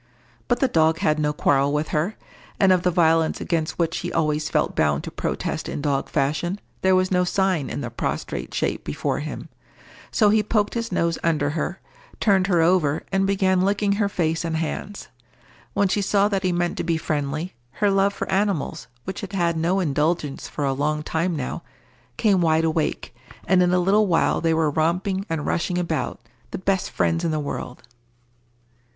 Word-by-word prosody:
But 245 - +1
the 270 - +4
dog 160 -5 +3
had 155 -1 +1
no 150 -1 +1
quarrel 140 -1 +2
with 150 +1 -1
her, 165 +8 -1 0.4
and 195 -2 +5
of 180 - +2
the 180 - +2
violence 165 -2 +2
against 165 -3 -2
which 165 -1 0
he 175 - -4
always 150 -1 0
felt - - 0
bound 75 -1 +1
to - - -6
protest - - -3
in - - -4
dog 140 -2 -1
fashion, 155 +7 -1 0.2
there 190 0 +4
was 185 0 +2
no 180 -1 +3
sign 180 -5 0
in - - -4
the - - -5
prostrate - - -3
shape - - -1
before - - -2
him; - - -6 0.6
so 210 -3 +3
he 215 0 +4
poked 210 0 0
his 230 -2 -3
nose 170 -2 0
under 150 -3 +1
her, 165 +4 -3 0.4
turned 195 -3 +3
her 175 -4 +3
over, 165 -4 +2
and 195 0 +2
began 190 -2 +2
licking 200 +1 +1
her 200 0 +1
face 165 -4 -1
and 165 -1 -1
hands. 190 +5 -4 0.7
When 200 - +3
she 205 +2 0
saw 200 +1 +3
that 195 -2 0
he 185 -1 +1
meant 175 0 -1
to - - -1
be 165 -1 0
friendly, 155 +2 -2 0.2
her 205 -1 +1
love 195 +1 +3
for - - -5
animals, 195 -5 -1 0.2
which 190 - -5
had 200 -1 -7
had 170 -3 +1
no 170 +4 +1
indulgence 150 -2 -1
for 145 - -3
a 135 - +1
long 150 +2 -1
time 165 +3 -1
now, 130 -4 -4 0.6
came 200 -4 +3
wide 160 -1 +3
awake, 160 -6 -1 0.3
and 185 0 +4
in 180 0 +3
a 180 - +3
little 200 +4 +3
while 170 -3 +2
they 165 -1 +2
were 160 -2 +2
romping 180 +6 0
and 160 -2 -2
rushing 175 +1 -1
about, 165 -3 -2 0.3
the - - -5
best 190 0 0
friends 165 +1 0
in 170 - +1
the 155 -1 -1
world. 140 -4 -5
170 Hz, 195 wpm, -23 LUFS, 155-190 Hz, 0.7 s, and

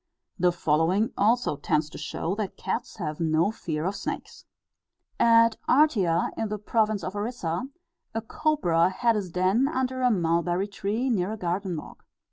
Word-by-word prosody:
The 180 0 +4
following 175 +6 +1
also 220 -6 +2
tends 150 +1 0
to - - -9
show 160 +3 -3
that 205 -1 -4
cats 190 - -3
have 155 -6 -4
no 165 +4 +2
fear 155 -7 -4
of 195 +2 -1
snakes: - - -6 0.7
"At 230 -1 +5
Artea, 230 - +3
in 225 - -2
the 210 - -2
province 215 -1 0
of 185 +3 -4
Orissa, 205 -1 -3 0.5
a 225 - 0
cobra 185 - +1
had 230 +4 +1
his 200 -4 -2
den 185 +9 +2
under 260 -3 -1
a 250 - +4
mulberry 175 -1 +1
tree, 205 +5 -2
near 200 -1 0
a - - -5
garden 180 -1 -2
walk. - - -10
195 Hz, 160 wpm, -26 LUFS, 170-230 Hz, 0.7 s, At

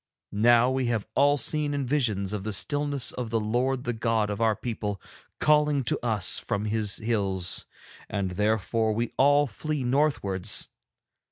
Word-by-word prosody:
Now 120 +4 +4
we 130 -1 0
have 115 -3 -1
all 145 +3 +4
seen 150 0 0
in 140 -1 -2
visions 110 -8 -1
of 105 -2 -3
the 110 0 -3
stillness 145 +4 0
the 115 -2 -2
Lord 125 +4 -1
the 120 - -2
God 110 -2 0
of 105 +2 -4
our 110 -1 +3
people 105 -3 -4 0.4
calling 150 -2 +3
to 120 - -1
us 105 -6 +1
from 105 -2 -3
His 105 -1 0
hills, 100 -5 -1 0.4
and 100 -3 -2
therefore 110 +3 0
we 115 +2 -2
all 145 +2 +4
flee 145 +4 -4
northwards. 120 -8 0
115 Hz, 155 wpm, -26 LUFS, 105-135 Hz, 0.4 s, Now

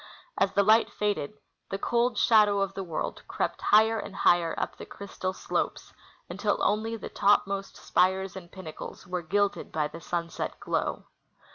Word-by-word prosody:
As 195 - +2
the 200 - +4
light 220 +3 +5
faded, 205 -4 -2 0.3
the 195 - -2
cold 235 +2 +1
shadoAV 210 -3 +5
of 195 0 -4
the 195 - -4
world 165 -4 -4
crept - - -2
higher 220 +1 +5
and 205 -2 -7
higher 170 -1 +3
up - - -2
the - - -9
crystal 190 -2 -5
slopes - - -3 0.3
until - - 0
only 220 +2 +1
the 225 - -7
topmost 200 -1 +1
spires 190 +1 +1
and 175 -2 -9
pinnacles 185 -5 -9
were 180 0 -3
gilded 200 +4 0
by 155 -1 0
the 165 +3 -10
sunset 170 -1 -3
glow. - - -2
195 Hz, 160 wpm, -28 LUFS, 180-210 Hz, 0.3 s, light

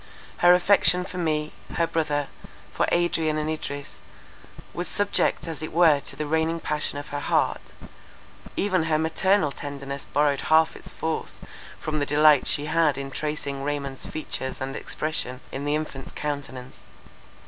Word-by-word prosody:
Her 175 0 +7
affection 180 -1 +4
for 180 -1 -6
me, 155 -2 -1 0.2
her 170 - +3
brother, 150 -3 0 0.5
for - - +1
Adrian 165 -3 +2
and 155 0 -1
Idris, 145 -2 -5 0.7
was 175 0 -2
subject 205 -5 0
as 160 -2 -5
it 155 - -5
were 160 -3 +5
to - - -6
the 150 - -3
reigning 160 +2 +1
passion 150 -2 -2
of 145 - -7
her 145 - -3
heart; - - 0 0.9
even 185 -5 +2
her 160 -1 +2
maternal 160 +1 +2
tenderness 140 -1 -6
borrowed 145 -1 +2
half 160 0 +4
its - - -9
force 160 -1 -3 0.4
from 155 0 -2
the 145 - -1
delight 150 -1 +5
she 145 - +1
had 155 -2 +2
in 135 0 -5
tracing 145 -1 -3
Raymond's 140 -2 -3
features 130 -4 -4
and 135 +1 -4
expression 150 -5 -2
in 140 +2 -4
the 145 +1 +1
infant's 145 -3 -5
countenance. 140 -4 -5
150 Hz, 155 wpm, -25 LUFS, 145-160 Hz, 0.9 s, Her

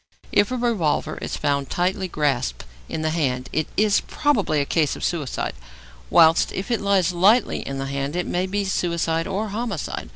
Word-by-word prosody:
If 205 - +3
a 255 - -1
revolver 220 -11 0
is - - -4
found 140 -2 0
tightly 185 +2 0
grasped 135 - -1 0.3
in 155 - -3
the 155 - +1
hand 130 -6 -1
it 155 - 0
is 210 -1 +3
probably 215 - +1
a 140 - +1
case 155 0 +1
of - - -8
suicide, 155 -7 -2 0.6
whilst 160 0 +5
if 195 +5 -4
it 235 - +1
lies 195 -3 +2
lightly 200 +8 +3
in 135 - -5
the 135 - -3
hand 140 +2 -3
it 180 - -1
may 180 +1 -1
be 200 +1 -1
suicide 170 -3 0
or 205 +3 -2
homicide. 200 - -4
170 Hz, 185 wpm, -23 LUFS, 145-200 Hz, 0.6 s, whilst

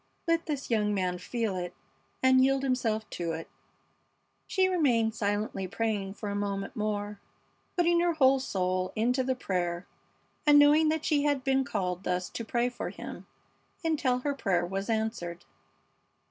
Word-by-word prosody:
Let 330 0 +1
this 285 -4 -3
young 210 -2 +2
man 180 -2 -1
feel 225 +1 -2
it 180 -1 -4 0.5
and 260 0 +6
yield 270 0 +2
himself 230 -5 0
to 170 -2 -3
it." 165 0 -6 1.0
She 380 -1 +2
remained 250 -11 +2
silently 205 -2 -1
praying 205 -1 -2
for 210 - -5
a 200 - -2
moment 200 -1 -3
more, 210 -1 -2 0.6
putting 345 -1 +4
her 345 0 +2
whole 270 -3 +4
soul 185 -5 -1
into 250 +4 +1
the 260 0 0
prayer 180 -6 -2 0.6
and 295 -1 +6
knowing 300 +2 +6
that 315 0 -1
she 295 -2 +2
had 285 -3 +1
been 270 0 +2
called 185 -7 -2
thus 180 -1 -1
to 230 - -4
pray 240 +2 0
for 250 - -4
him - - -9 0.6
until 290 -6 +1
her 285 +2 0
prayer 185 -10 0
was 195 +4 -4
answered. 220 -6 -2
225 Hz, 160 wpm, -29 LUFS, 195-270 Hz, 1.0 s, and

